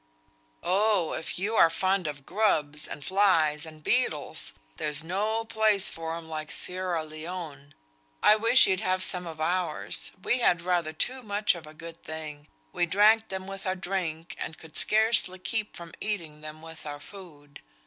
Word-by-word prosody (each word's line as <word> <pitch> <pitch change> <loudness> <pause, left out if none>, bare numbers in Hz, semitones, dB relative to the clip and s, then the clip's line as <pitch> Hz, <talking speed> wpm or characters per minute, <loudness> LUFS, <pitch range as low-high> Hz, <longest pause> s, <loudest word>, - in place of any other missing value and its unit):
"Oh! 200 -3 +2
if 160 - -4
you 200 +5 -1
are 165 - +7
fond 185 +1 +1
of 145 -2 -6
grubs, 155 -8 +1
and 145 - -8
flies, 165 -6 +3
and 155 -1 -13
beetles, 150 - 0 0.2
there's 150 0 -1
no 210 +6 -1
place 215 -3 +3
for 165 0 -4
'em 165 -1 -10
like 155 -1 -5
Sierra 180 -3 -2
Leone. 155 -3 -8 0.5
I 210 - +8
wish 230 +4 +6
you'd 190 -1 +1
had 185 -3 +1
some 180 -2 +2
of 160 -2 -8
ours; 170 0 -1
we 250 - +2
had 175 -7 +3
rather 175 -3 +1
too 255 +11 -2
much 210 -2 +1
of 170 -3 -9
a 155 - -12
good 165 +1 -10
thing; 155 -2 -6 0.3
we 175 - +1
drank 215 +5 +4
them 190 -1 -4
with 195 0 -7
our 185 - +1
drink, 175 -3 -3
and 160 - -5
could 160 -2 -14
scarcely 220 -4 +3
keep 215 +3 -3
from 170 -1 -10
eating 165 -8 -3
them 155 +1 -9
with 160 -1 -10
our 145 0 -5
food. 145 -6 -13
175 Hz, 170 wpm, -28 LUFS, 155-200 Hz, 0.5 s, I